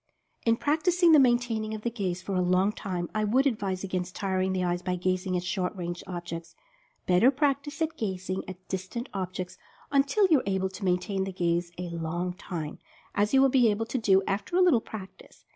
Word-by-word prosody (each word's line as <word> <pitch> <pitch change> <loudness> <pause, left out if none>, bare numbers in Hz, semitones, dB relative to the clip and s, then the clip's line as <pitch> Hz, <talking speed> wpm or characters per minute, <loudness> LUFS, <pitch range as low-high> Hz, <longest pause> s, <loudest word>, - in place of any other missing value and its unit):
In 230 0 +4
practicing 335 +5 +3
the 310 - +8
maintaining 240 -4 +2
of 215 - -8
the 235 - -1
gaze 185 -6 -3
for 200 - -4
a 185 - +2
long 185 +3 +3
time, 180 -5 -4
I 215 - 0
would 250 +6 +3
advise 200 -8 -1
against 185 -1 -3
tiring 190 -1 0
the 185 -1 0
eyes 175 0 0
by 180 0 -1
gazing 185 +1 0
at 175 - -3
short 180 +1 -2
range 175 -1 -5
objects. 175 -2 -6 0.5
Better 185 +8 +5
practice 285 +3 0
at 320 +1 -3
gazing 185 -3 -3
at 185 0 -10
distant 190 +7 -4
objects 185 -1 -4 0.3
until 280 +9 +3
you 300 - +7
are - - -6
able 190 -1 0
to 190 +2 -9
maintain 190 +2 0
the 195 - -4
gaze 175 -1 0
a 175 -1 -5
long 170 +2 -2
time, 170 -5 -6 0.3
as 205 +1 +1
you 270 0 +5
will 270 - +5
be 250 -3 +5
able 215 +2 0
to 235 +3 -2
do 195 -3 +4
after 200 - -2
a 370 - +5
little 340 -11 +5
practice. 195 -4 -11
190 Hz, 205 wpm, -28 LUFS, 180-235 Hz, 0.5 s, the